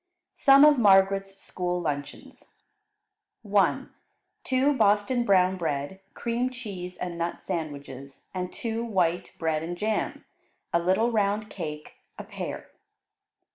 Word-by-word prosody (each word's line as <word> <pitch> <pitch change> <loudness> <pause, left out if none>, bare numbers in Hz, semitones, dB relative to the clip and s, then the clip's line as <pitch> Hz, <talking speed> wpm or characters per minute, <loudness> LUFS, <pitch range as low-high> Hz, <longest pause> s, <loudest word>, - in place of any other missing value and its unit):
Some 275 +1 +7
of 295 -3 +5
Margaret's 195 -1 +4
School 180 -2 -3
Luncheons 145 -4 -6 0.9
1. 200 -2 +1 0.5
Two 265 +2 +2
Boston 210 +1 +2
brown 185 -2 +3
bread, 160 +2 -3 0.2
cream 235 +2 -1
cheese, 200 -8 -7
and 175 -1 -5
nut 170 +1 -3
sandwiches, 140 -6 -6
and 180 -1 -4
two 230 0 -3
white 180 -6 -1
bread 160 -2 -1
and 175 +2 -5
jam; 215 +2 -2 0.5
a 170 - +4
little 190 +7 +2
round 210 -1 0
cake; 150 -4 -7 0.2
a - - -6
pear. - - -7
190 Hz, 120 wpm, -26 LUFS, 170-220 Hz, 0.9 s, Some